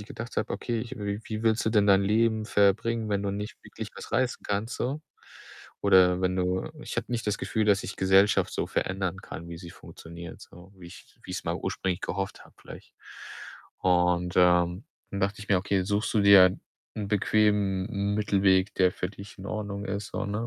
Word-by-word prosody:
ich 105 - -10
gedacht 115 +2 -8
habe: - - -1
„Okay, 115 -2 -2
ich 120 - -7
w 100 0 -3
wie 110 0 -5
willst 110 0 +2
du - - +3
denn 105 -2 +3
dein 100 -1 +5
Leben 110 +1 +2
verbringen, 110 +3 +2
wenn 100 0 0
du 100 - -1
nicht 105 +2 -5
wirklich - - -8
was - - -10
reißen 130 -1 0
kannst 105 +4 -2
so? 135 +5 -2 0.8
Oder 95 -2 +5
wenn 90 0 +1
du“ 90 +7 -1
Ich - - -7
habe 115 - -1
nicht 115 -2 -2
das 105 - 0
Gefühl, 110 - -1
dass 100 -1 +3
ich 95 - -6
Gesellschaft 95 +2 +3
so - - -2
verändern 95 0 -2
kann, 85 -3 -9
wie 85 -1 -7
sie 85 -2 -10
funktioniert, 85 +1 -11
so, 90 +3 -15
wie 90 - -12
ich 95 - -15
wie - - -7
ich's - - -5
mal - - -1
ursprünglich 95 -1 -3
gehofft 95 +1 -4
habe, - - -21
vielleicht - - -13 0.9
und, 90 -1 +2
ähm, 90 +2 +3 0.3
dann 100 - -4
dachte 100 +1 -1
ich 105 - -10
mir: 95 -2 +4
„Okay, 95 0 0
suchst 105 +3 -1
du 105 - +4
dir 95 -2 +7 0.4
'nen 105 -2 -4
bequemen 105 -1 +1
M 100 -2 -1
Mittelweg, 100 -2 +2
der 90 -1 +3
für 90 - -3
dich 100 0 -12
in 95 - -8
Ordnung 100 -1 -4
ist.“, 100 +2 -4
so, - - -2
ne, 105 +3 -3
100 Hz, 205 wpm, -27 LUFS, 95-105 Hz, 0.9 s, dir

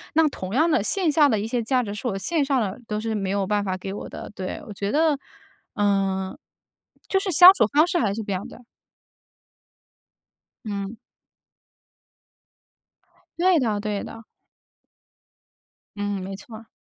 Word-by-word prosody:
那 320 -1 +5
同 185 -5 -7
样 315 +6 +3
的， 280 -10 +2
线 365 - +1
下 295 -2 +5
的 215 -3 +1
一 215 - -3
些 235 0 -1
价 255 +2 +1
值 205 -3 -5
是 225 - -8
我 195 - -3
线 295 - 0
上 270 -2 +1
的 200 +2 -3
都 210 0 -2
是 220 0 -2
没 195 -2 -2
有 200 -1 0
办 205 0 +1
法 185 -1 -2
给 190 +1 -6
我 - - -7
的。 - - -8
对， 185 -1 -5
我 210 - -7
觉 200 +1 -3
得， 305 -1 +2 0.6
嗯， 195 -2 0 0.7
就 385 - +2
是 385 -1 -2
相 360 +4 +10
处 220 - +3
方 305 +4 +4
式 355 - 0
还 205 -4 +1
是 225 - -4
不 205 - -10
一 - - +1
样 185 +1 -4
的。 - - -13 2.1
嗯。 200 0 -4 2.4
对 355 -2 +4
的 215 -5 0
对 210 -1 -3
的。 225 0 -10 1.7
嗯， 205 -1 -3
没 195 +1 -6
错 220 +3 -11
儿。 225 - -15
215 Hz, 180 characters per minute, -24 LUFS, 200-285 Hz, 2.4 s, 相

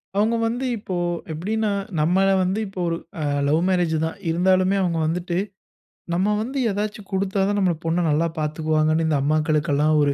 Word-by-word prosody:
அவங்க 220 +3 +2
வந்து 245 +3 -2
இப்போ 190 -3 -5 0.4
எப்டினா 210 +7 -1 0.3
நம்மல 185 +5 +3 0.2
வந்து, 190 +4 0
இப்போ 190 -2 -6 0.7
லவ் 155 +3 +2
மேரேஜ் 175 -3 +1
தான். 160 - -5
இருந்தாலுமே 185 +2 +3
அவங்க 170 -2 0
வந்துட்டு 175 +1 -2 0.8
நம்ம 185 +4 +1
வந்து 260 +5 -4
ஏதாச்சு 210 +1 -3
குடுத்தா 195 +1 -1
தான் 205 0 0
நம்ப 180 -3 +3
பொண்ண 170 +2 +1
நல்லா 160 +3 +2
பாத்துக்குவாங்கனு 155 +1 +1
இந்த 150 -2 +2
அம்மாக்களுக்குலாம் 155 0 +2
ஒரு 140 -1 +2
175 Hz, 150 wpm, -23 LUFS, 155-195 Hz, 0.8 s, நம்மல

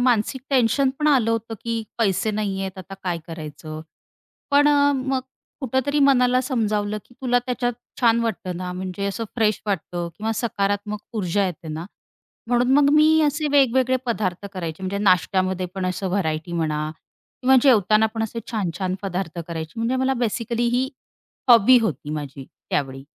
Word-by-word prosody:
मानसिक 245 +1 +1
टेन्शन 260 +1 +3
पण 305 - 0
आलं 255 -6 +3
होतं 225 0 -2
की 230 -1 -1 0.2
पैसे 215 -1 +1
नाहीहेत 195 -2 -3
आता 185 +1 -8
काय 175 -2 -1
करायचं. 155 -1 -7 0.7
पण 290 +1 +5
अ, 285 -1 +4
मग 265 0 -1 0.4
कुठेतरी 265 +2 0
मनाला 255 -2 +4
समजावलं 215 -5 -1
की 245 - -21
तुला 245 -1 +3
त्याच्यात 245 -1 -1 0.3
छान 235 -1 +4
वाटतं 185 -6 -3
ना 180 0 -4
म्हणजे 185 +2 -4
असं 215 +3 -3
फ्रेश 215 -3 +2
वाटतं 175 -3 -2
किंवा 220 +1 -2
सकारात्मक 205 -2 -1
ऊर्जा 200 -1 0
येते 175 -2 -6
ना, 155 +2 -5 0.6
म्हणून 245 +1 +2
मग 285 0 +5
मी 310 +1 +5
असे 300 +1 +1
वेगवेगळे 260 -2 +4
पदार्थ 200 -5 -2
करायचे. 170 -1 -5
म्हणजे 195 +2 -2
नाश्त्यामध्ये 185 -1 +2
पण 190 -1 -2
असं 185 +1 -2
व्हरायटी 170 -3 -1
म्हणा 155 -2 -1 0.5
किंवा 265 +1 +6
जेवताना 220 -4 +5
पण 225 - -1
असे 225 +1 -4
छान-छान 185 -3 -2
पदार्थ 180 -3 -3
करायचे, 160 -1 -5
म्हणजे 235 +3 0
मला 260 +1 +1
बेसिकली 235 +1 -1
ही 260 +1 0 0.6
हॉबी 240 +1 +8
होती 150 - -2
माझी 140 -2 -6 0.3
त्यावेळी. 135 -1 -2
215 Hz, 155 wpm, -23 LUFS, 185-250 Hz, 0.7 s, हॉबी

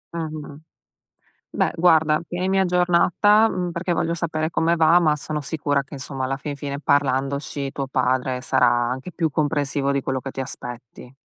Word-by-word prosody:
Mh-mh. 155 -2 -6 0.9
Beh - - +1
guarda, 160 -3 +4
tienimi 185 +2 0
aggiornata, 180 +4 +3
mhmm, 180 -4 -3
perché 175 +1 -2
voglio 165 0 0
sapere 155 -1 -2
come 170 0 +1
va, 165 +1 +5
ma 155 -3 +2
sono 150 +1 -4
sicura 145 -1 -1
che 145 - -15
insomma, 135 -1 -4
alla 135 +1 -1
fin 145 0 -5
fine, 140 0 -5
parlandoci 140 0 0
tuo 135 -1 -4
padre 130 -1 0
sarà 130 -1 +3
anche 120 +7 -1
più 165 -3 0
comprensivo 145 -2 0
di 140 - 0
quello 130 0 -2
che 135 +1 -7
ti 135 - -4
aspetti. 125 -1 -9
145 Hz, 165 wpm, -22 LUFS, 135-170 Hz, 0.9 s, va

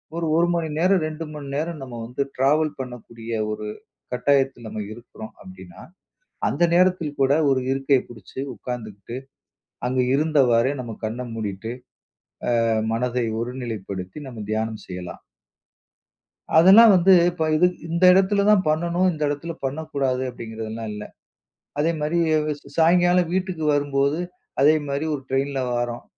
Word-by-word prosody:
ஒரு 170 0 -2
1 170 +1 +3
மணி 165 -2 -1
நேரம், 185 +2 +3
2 155 +1 -6
மணி 145 -2 -7
நேரம் 160 +1 -3
நம்ம 120 -3 -7
வந்து 125 +3 -4
ட்ராவல் 150 +3 +2
பண்ணக்கூடிய 115 -2 -7 0.2
ஒரு 105 0 -5 0.5
கட்டாயத்தில 135 -2 +1
நம்ம 110 0 -5
இருக்குறோம் 110 -1 -11
அப்டின்னா, 95 -2 -12 0.7
அந்த 155 - -2
நேரத்தில் 175 -5 +2
கூட 135 0 +4 0.2
ஒரு 130 -1 +2
இருக்கையை 135 0 +2
புடிச்சு 110 +2 -9
உக்காந்துகிட்டு, 115 -1 -7 0.7
அங்க 130 0 -1 0.2
இருந்தவாரே 135 -5 +3
நம்ம 115 -3 -7
கண்ண 115 +3 -4
மூடிட்டு, 110 +1 -4 0.9
அ - - +1 0.2
மனத 125 +1 -1 0.2
ஒருநிலைப்படுத்தி 110 -6 -5
நம்ம 120 -4 -8
தியானம் 110 0 -2
செய்யலாம். 90 -1 -7 1.4
அதெல்லாம் 200 +6 +9
வந்து, 185 +2 +5 0.2
இப்ப 170 -2 -5
இது 180 +3 +5 0.2
இந்த 170 +2 +1
இடத்துல 195 +2 +3
தான் 205 -3 +5
பண்ணணும், 170 +4 +1
இந்த 155 - -6
இடத்துல 145 +4 -3
பண்ணக்கூடாது 135 -2 -2
அப்டிங்கிறதல்லாம் 110 -1 -6
இல்ல. 105 - -6 0.8
அதே 165 +3 +2
மாரி, 155 +3 0 0.6
சாயங்காலம் 175 +1 +4
வீட்டுக்கு 185 -3 -2
வரும்போது, 140 +1 +1 0.4
அதே 150 +2 +6
மாரி 140 +3 -2
ஒரு 145 - -3
ட்ரைனில்ல 135 0 0
வாரோம். 120 0 -3
135 Hz, 130 wpm, -23 LUFS, 115-160 Hz, 1.4 s, அதெல்லாம்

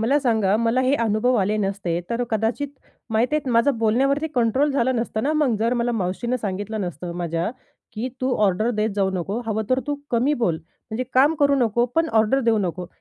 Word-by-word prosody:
मला 270 +6 +3
सांगा 220 -5 +2
मला 230 +3 +1
हे 260 +2 +2
अनुभव 225 +4 +2
आले 205 +2 +1
नसते 195 -4 -1
तर 235 +1 0
कदाचित 225 +6 -1 0.4
माहिती 240 +7 +2
आहे, 275 -4 -2
माझं 235 +2 +3
बोलण्यावरती 270 +7 +2
कंट्रोल 255 +5 +2
झालं 260 -1 +1
नसतं 230 -1 -2
ना 295 +3 +1
मग 295 -7 +2
जर 230 +2 +1
मला 240 0 0
मावशीनं 225 +5 -1
सांगितलं 205 +2 -3
नसतं 175 -1 -5
माझ्या, 170 +1 -2 0.4
की 230 +4 -3
"तू 255 0 +1
ऑर्डर 215 +5 +1
देत 215 -1 0
जाऊ 195 -1 +2
नको, 195 +6 -2
हवं 220 0 -1
तर 255 +1 +3
तू 290 - 0 0.2
कमी 250 +5 +2
बोल 170 -6 +2 0.3
म्हणजे 245 +4 -2
काम 285 +5 +5
करू 280 0 +4
नको, 240 -2 +2
पण 325 0 +2
ऑर्डर 225 +5 +3
देऊ 230 -3 +2
नको." 180 -2 -3
230 Hz, 200 wpm, -23 LUFS, 205-255 Hz, 0.4 s, काम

